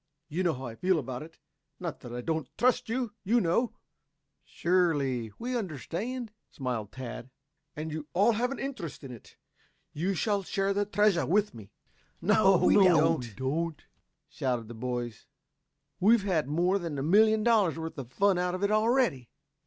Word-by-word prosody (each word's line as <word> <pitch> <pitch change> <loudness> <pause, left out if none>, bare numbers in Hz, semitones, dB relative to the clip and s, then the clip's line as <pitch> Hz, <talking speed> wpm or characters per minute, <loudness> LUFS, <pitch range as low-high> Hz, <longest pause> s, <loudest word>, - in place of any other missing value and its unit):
You 165 +4 -2
know 175 -5 +1
how 130 +1 -7
I 115 - -6
feel 180 +9 +1
about 130 -4 -4
it 165 +2 -11 0.4
not 170 -5 -5
that 120 - -10
I 120 0 -4
do 160 - 0
not 160 -4 -4
trust 250 -2 +2
you. 240 -2 -2
You 230 +5 +3
know 220 +6 +1 0.4
" - - -52
"Surely 145 -10 0
we 250 +2 -3
understand," 215 - -4 0.2
smiled 120 -6 -4
Tad. 125 -1 -7 0.5
"And 155 +1 -5
you 155 -1 -5
all 205 +6 +4
have 235 +3 0
an 275 - -5
interest 230 - -6
in 135 - -8
it 120 - -13 0.6
you 185 +6 -1
shall 205 +2 0
share 195 +1 -1
the 205 +1 0
treasure 205 -4 +2
with 205 +3 +2
me 105 -4 -11 0.3
" - - -36
"No, 195 0 +4
we - - +4
don't," 155 - +2 0.4
shouted 125 -4 -2
the - - -7
boys. 120 -1 -4 0.7
"We've 215 +2 +5
had 170 -8 0
more 175 +6 +1
than 165 -5 -4
a 135 - -2
million 215 +6 +4
dollars 210 -9 +3
worth 160 0 -5
of 125 -2 -8
fun 195 +1 +2
out 180 0 0
of 185 - -5
it 200 - +2
already." 215 - +2
175 Hz, 175 wpm, -29 LUFS, 135-205 Hz, 0.7 s, We've